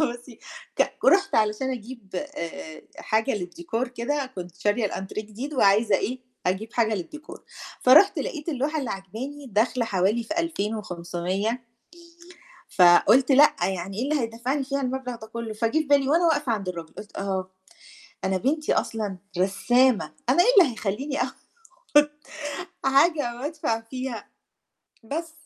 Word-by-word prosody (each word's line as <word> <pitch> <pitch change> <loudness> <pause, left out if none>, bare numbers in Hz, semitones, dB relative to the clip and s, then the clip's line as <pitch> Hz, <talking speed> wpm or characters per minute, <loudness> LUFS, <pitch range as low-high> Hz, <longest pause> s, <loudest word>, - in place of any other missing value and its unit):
بُصي 240 -4 -3 0.4
ك - - +1
رُحت 395 +1 +4
علشان 215 +5 +1
أجيب 235 -3 -7
أ 290 - -2
أ 170 - -7 0.2
حاجة 220 +4 0
للديكور 180 +5 -3
كده، 260 +4 -2
كنت 180 -8 -8
شارية 205 +4 +1
الأنتريه 195 +2 -5
جديد، 250 +8 -6
وعايزة 205 -2 +4
إيه، 255 +3 -3 0.3
أجيب 210 +6 -1
حاجة 225 -2 +2
للديكور، 300 - -8 0.4
فرُحت 310 +11 +6
لقيت 305 -1 -4
اللوحة 300 +1 -1
اللي 265 -6 -3
عاجباني 235 +10 -6
داخلة 235 +2 +1
حوالي 205 +2 +1
في 315 +9 -4
2500 210 - -2 1.1
فقُلت 200 +9 +6
لأ 285 +3 +7
يعني 190 +1 -4
إيه 235 - 0
اللي 290 +1 0
هيدَفّعني 240 +5 -2
فيها 275 +1 -2
المبلغ 255 -1 -3
ده 220 -1 -11
كُلُّه، 230 -1 -5
فجِه 230 +7 +1
في - - +1
بالي، 280 -1 +4
وأنا 335 +3 +4
واقفة 295 -6 +2
عند 200 -4 -2
الراجل، 170 -3 -7
قُلت 205 0 -10
أها، 190 -1 -2 0.8
أنا 190 0 +1
بنتي 295 - 0
أصلًا 210 -4 -2 0.2
رسّامة 215 0 +2 0.2
أنا 275 +8 +5
إيه 450 - +2
اللي 320 -10 +6
هيخليني 245 +7 -2
أخُد - - -4 1.5
حاجة 275 -2 +3
وأدفع 260 -4 -2
فيها! 255 -1 -6 0.8
بس 320 +7 -4
235 Hz, 140 wpm, -25 LUFS, 200-275 Hz, 1.5 s, لأ